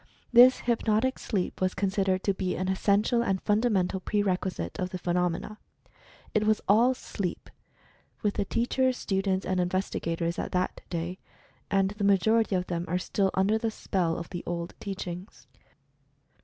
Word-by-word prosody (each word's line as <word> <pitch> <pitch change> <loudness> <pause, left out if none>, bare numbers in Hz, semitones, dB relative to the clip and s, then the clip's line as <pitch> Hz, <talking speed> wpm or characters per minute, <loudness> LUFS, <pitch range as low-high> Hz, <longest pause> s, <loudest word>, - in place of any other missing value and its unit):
This 250 +2 +8
"hypnotic 235 +1 +1
sleep" 190 -4 -2
was 185 0 +1
considered 190 -1 0
to 200 - +2
be 185 -1 -2
an 185 +1 -2
essential 205 +5 +2
and 195 -5 0
fundamental 205 -4 +1
pre 205 +2 0
requisite 180 - -2
of 180 - -1
the 185 - -5
phenomena. 180 +4 -1 0.7
It 215 0 +2
was 215 0 +3
all 235 +6 +5
"SLEEP," 195 -7 -5 0.7
with 205 -1 +1
the 205 - -1
teachers, 255 +4 +1
students, 190 -1 -1
and 185 0 0
investi 185 +2 -1
gators 165 +1 -2
at - - -4
that 180 0 -1
day 175 +2 -4 0.3
— - - -32
and 195 -1 +2
the 210 0 -5
majority 200 +2 +3
of 180 0 0
them 175 -1 -3
are 180 - 0
still 195 +1 0
under 200 +4 +2
the 225 - 0
spell 180 -6 -1
of 170 - -7
the 175 -2 -4
old 170 0 -3
teachings. 180 - -7
190 Hz, 165 wpm, -28 LUFS, 180-215 Hz, 0.7 s, This